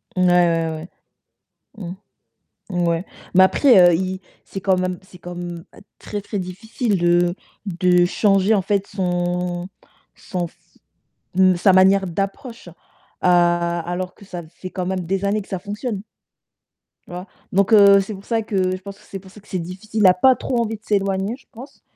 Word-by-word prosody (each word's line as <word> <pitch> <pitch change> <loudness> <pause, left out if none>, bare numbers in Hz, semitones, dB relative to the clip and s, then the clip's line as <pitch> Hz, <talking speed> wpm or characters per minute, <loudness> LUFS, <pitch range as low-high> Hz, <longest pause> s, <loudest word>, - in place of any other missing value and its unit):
Ouais, - - -2
ouais, 165 -2 +2 0.9
ouais. 210 - -8 0.9
Mmh, 175 -2 -1
ouais, 170 +1 0 0.3
mais 185 +1 +8
après 245 +4 +5
heu, - - +3
il 185 +2 -2 0.2
c'est 195 - -7
quand 190 0 +2
même 185 -1 -2
c'est 190 -1 -16
comme 175 -1 -7 0.3
très, 205 - -5
très 205 +1 -5
difficile 200 +4 -2
de 175 0 +2 0.3
de 180 -1 +3
changer, 195 +3 +2
en 200 - +2
fait, 200 +1 0
son 175 -1 -2 0.5
son 180 -2 -4
f - - -26 0.8
mmh 185 0 +4
sa 190 +3 +4
manière 190 +1 +5
d'approche, 195 +5 -5
heu, - - -11 0.5
alors 175 0 +1
que - - -16
ça 180 -3 -7
fait 185 +3 -10
quand 180 -1 -4
même 190 0 -1
des 190 +3 -2
années 205 +1 0
que - - -19
ça 190 - -3
fonctionne 205 +2 -5 1.1
Tu - - -11
vois? 180 +1 -6 0.3
Donc 195 +2 +2
heu, 200 -2 +8
c'est 195 +3 -6
pour 195 0 -11
ça 230 -1 0
que 190 -4 -1
je 185 - -10
pense 200 +1 -9
que 210 - -21
c'est 195 - -7
pour 190 0 -16
ça 210 - -14
que 205 - -22
c'est 185 - -3
difficile. 190 +6 -5
Il - - +4
n'a 185 -2 +8
pas 255 +8 +4
trop 245 +1 -3
envie 225 -1 -2
de 215 - -16
s'éloigner, 195 0 0
je - - -25
pense, 255 +5 -12
185 Hz, 185 wpm, -21 LUFS, 175-200 Hz, 1.1 s, mais